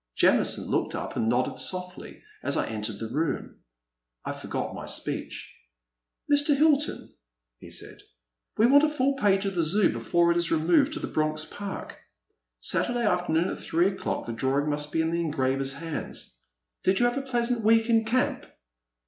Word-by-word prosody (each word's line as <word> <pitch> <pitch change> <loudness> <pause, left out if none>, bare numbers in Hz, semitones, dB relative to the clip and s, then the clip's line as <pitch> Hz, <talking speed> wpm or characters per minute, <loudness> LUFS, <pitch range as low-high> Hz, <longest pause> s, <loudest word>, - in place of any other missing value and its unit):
Jamison - - +3
looked - - -1
up - - -5
and 110 - 0
nodded 125 +2 0
softly 180 -1 -3 0.2
as - - +2
I - - +1
en 110 -1 -5
tered 105 -1 -2
the 115 - -4
room. 160 +4 -3 0.7
I - - -2
forgot - - -5
my - - -8
speech. - - -3 0.7
Mr. 290 0 +3
Hilton," 300 0 +1 0.5
he - - -12
said, - - -4 0.3
*' - - -45
we 220 - +5
want 285 +4 +6
a 310 - +4
full 275 -2 +1
page 200 -6 +2
of 195 - -1
the 175 - 0
Zoo 175 - +3
before 170 +10 +1
it 170 - +1
is 170 -1 +1
removed 175 - +2
to 325 - -4
Bronx 155 0 -1
Park. 200 +2 -7 0.6
Saturday 240 - +2
afternoon 175 -3 +1
at - - -5
three 170 +4 +1
o'clock 195 - -4
the 115 - -5
drawing 135 +5 0
must 150 0 0
be 160 - +1
in 160 - -1
the 170 0 0
engraver's 135 -3 0
hands. 160 - -6 0.5
Did 190 +1 +2
you 240 - +3
have 240 +2 0
a - - -1
pleasant 240 -3 -1
week 225 +1 +4
in 225 -1 +3
camp 245 +3 -1
180 Hz, 180 wpm, -26 LUFS, 150-240 Hz, 0.7 s, want